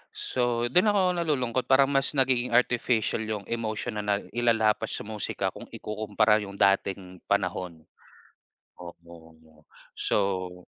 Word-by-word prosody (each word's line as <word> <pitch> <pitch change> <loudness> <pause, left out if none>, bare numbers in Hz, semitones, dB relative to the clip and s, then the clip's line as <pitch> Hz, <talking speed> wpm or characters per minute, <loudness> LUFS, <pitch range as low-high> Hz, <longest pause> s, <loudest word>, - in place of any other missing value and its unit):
So, 120 -1 -1
dun 180 +9 +4
ako 205 -1 +3 0.2
nalulungkot 130 -7 -1
para 135 +1 +6
mas 140 +1 0
nagiging 125 -2 +2
artificial 120 -2 +1
yung 110 -2 -4
emotion 110 -1 -3
na - - -1 0.2
nailalapat 115 -3 +1
sa - - -3
musika 105 -1 -3
kung - - -10
ikukumpara 105 0 0
yung 100 -1 -8
dating 95 -2 0
panahon. 85 -4 -2 1.0
Oo, 80 -3 -14 0.3
so 90 -3 -1
110 Hz, 115 wpm, -27 LUFS, 95-125 Hz, 1.0 s, para